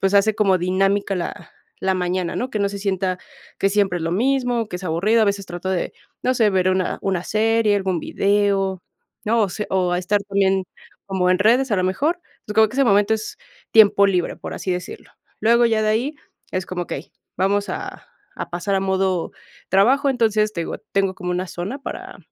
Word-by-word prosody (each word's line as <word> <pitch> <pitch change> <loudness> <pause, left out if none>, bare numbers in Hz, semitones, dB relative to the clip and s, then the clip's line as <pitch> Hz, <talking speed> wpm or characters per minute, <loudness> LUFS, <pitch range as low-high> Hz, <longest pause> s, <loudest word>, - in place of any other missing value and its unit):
pues, 195 +1 +1
hace 200 +2 +4
como 200 -3 +3
dinámica 195 +3 +1
la 175 - -5 0.3
la 190 0 +1
mañana, 180 -1 -1
¿no?, 250 - -2
que 215 - -2
no 200 - +2
se 200 - -6
sienta 190 -2 -1 0.4
que 195 - +2
siempre 195 -3 +1
es - - -6
lo 165 - -1
mismo, 245 +2 +1
que 180 - -4
es 185 - -9
aburrido, 190 +7 +2
a - - +5
veces 200 -1 -1
trato 175 +1 -6
de, 185 -2 -1 0.3
no 255 - +2
sé, 225 -4 +3
ver 185 -1 +2
una 185 -1 0
una 185 -3 -1
serie, 220 -1 +2
algún 190 -3 -1
video, 195 -2 +1 0.4
¿no?, 225 +1 +2
o 205 - +1
se 210 +3 -4
o 185 -2 +1
a 175 - +1
estar 200 +3 0
también 195 -1 +1 0.4
como 190 -2 0
en 185 - +3
redes, 240 +5 +3
a - - +3
lo 185 - +1
mejor. 285 - 0 0.2
Entonces, 210 - -8
como 220 0 +6
que 220 - -11
ese 275 +1 +3
momento 205 -1 +4
es 220 -1 -6 0.4
tiempo 200 -2 +6
libre, 180 -3 0
por - - -7
así 185 - -2
decirlo. 180 0 -6 0.3
Luego, 235 +2 +4
ya 220 -1 +1
de 215 - +1
ahí, 240 +8 0 0.4
es 185 -1 -2
como, 180 -1 -3
okey, - - -7 0.2
vamos 200 +2 +1
a - - -7 0.3
a - - -5
pasar 175 +3 -2
a - - +1
modo 190 -2 0 0.4
trabajo. 245 +10 +4
Entonces, 220 -4 +2
te 170 - -2
digo, - - -5
tengo 195 -1 +1
como 180 -1 -5
una 180 +1 -2
zona 185 +12 -5
para - - -7
195 Hz, 210 wpm, -21 LUFS, 185-215 Hz, 0.4 s, como